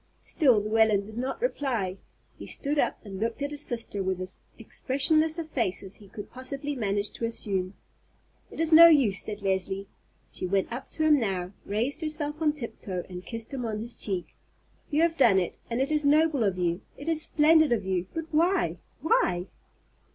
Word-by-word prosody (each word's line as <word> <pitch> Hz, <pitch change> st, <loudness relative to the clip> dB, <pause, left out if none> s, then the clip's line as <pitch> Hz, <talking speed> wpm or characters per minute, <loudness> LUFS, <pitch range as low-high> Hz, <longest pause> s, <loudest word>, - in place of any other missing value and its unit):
Still 260 Hz, -9 st, +3 dB
Llewellyn 215 Hz, -1 st, +2 dB
did 215 Hz, +1 st, -11 dB
not 255 Hz, -, -3 dB
reply. 235 Hz, -, -1 dB, 0.4 s
He -, -, -10 dB
stood 290 Hz, +1 st, -2 dB
up -, -, +1 dB
and 195 Hz, -2 st, -7 dB
looked 230 Hz, +5 st, -2 dB
at 285 Hz, -, -2 dB
his 295 Hz, 0 st, -4 dB
sister 230 Hz, -7 st, -3 dB
with 190 Hz, -1 st, -1 dB
as 185 Hz, 0 st, -3 dB, 0.2 s
expressionless 310 Hz, +4 st, +1 dB
a 335 Hz, -, -2 dB
face 240 Hz, -, -1 dB
as 190 Hz, 0 st, -9 dB
he 205 Hz, -, -15 dB
could 205 Hz, +1 st, -9 dB
possibly 275 Hz, +3 st, -4 dB
manage 205 Hz, -3 st, -1 dB
to 230 Hz, -, -4 dB
assume. 195 Hz, -4 st, -2 dB, 0.7 s
"It -, -, -11 dB
is 325 Hz, 0 st, +2 dB
no 335 Hz, +1 st, +11 dB
use," 265 Hz, -, +4 dB
said 210 Hz, -1 st, -5 dB
Leslie. 195 Hz, 0 st, -1 dB, 0.4 s
She 185 Hz, -, -4 dB
went 195 Hz, +4 st, 0 dB
up 260 Hz, +2 st, -6 dB
to 315 Hz, -, -1 dB
him 305 Hz, -2 st, +5 dB
now, 190 Hz, -4 st, -2 dB
raised 235 Hz, +10 st, -1 dB
herself 305 Hz, -1 st, -1 dB
on 300 Hz, -2 st, +3 dB
tiptoe, 210 Hz, -, -5 dB
and 180 Hz, 0 st, -7 dB
kissed 230 Hz, +3 st, -7 dB
him 260 Hz, -2 st, -3 dB
on 220 Hz, -2 st, -2 dB
his 230 Hz, +3 st, -3 dB
cheek. 185 Hz, -5 st, -4 dB, 0.6 s
"You 305 Hz, +2 st, +2 dB
have 335 Hz, -1 st, +1 dB
done 230 Hz, -8 st, +5 dB
it, 180 Hz, -2 st, -1 dB
and 235 Hz, +1 st, -1 dB
it 270 Hz, +3 st, 0 dB
is 300 Hz, -1 st, +1 dB
noble 295 Hz, -2 st, +3 dB
of 195 Hz, -3 st, 0 dB
you, 175 Hz, +1 st, 0 dB, 0.2 s
it 285 Hz, -, -9 dB
is 325 Hz, -1 st, +2 dB
splendid 315 Hz, -1 st, +4 dB
of 215 Hz, -5 st, +1 dB
you; 185 Hz, -1 st, -1 dB
but 325 Hz, -1 st, -4 dB
why—why?" 335 Hz, -, +1 dB
235 Hz, 190 wpm, -27 LUFS, 195-300 Hz, 0.7 s, no